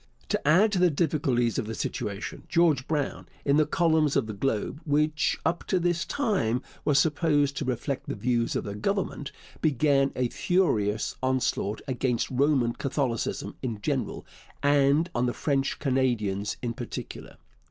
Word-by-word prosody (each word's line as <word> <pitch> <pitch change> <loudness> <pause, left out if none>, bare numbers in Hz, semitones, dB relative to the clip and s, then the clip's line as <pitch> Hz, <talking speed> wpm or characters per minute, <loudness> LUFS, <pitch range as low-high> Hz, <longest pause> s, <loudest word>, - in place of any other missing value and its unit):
To - - -1
add 190 +8 +5
to 190 - +1
the 180 0 +5
difficulties 140 -7 +1
of - - -3
the 110 - -4
situation, 100 -1 -4
George 160 -6 +3
Brown, 150 -3 -2 0.2
in 140 +1 +4
the 155 - +3
columns 160 -4 +2
of 140 - +2
the 110 - -5
Globe, 110 +6 -2
which 150 0 +1
up 170 +2 0
to 185 - +1
this 175 -1 0
time 160 - 0 0.2
was 145 -2 +3
supposed 145 -2 +2
to - - -2
reflect 130 +2 -3
the - - -2
views 120 -2 0
of - - -1
the 100 - -5
Government, 155 - -2 0.3
began 140 -2 +3
a 125 -1 +1
furious 110 - +1
onslaught 130 -5 0
against 125 -2 -1
Roman 130 -3 +2
Catholicism 130 -4 -2
in 115 -5 -3
general - - -2 0.4
and 145 +4 +3
on 120 +1 +1
the 120 - -1
French 140 -2 0
Canadians 120 -8 0
in 120 -1 -1
particular. - - -7
140 Hz, 155 wpm, -27 LUFS, 120-155 Hz, 0.4 s, add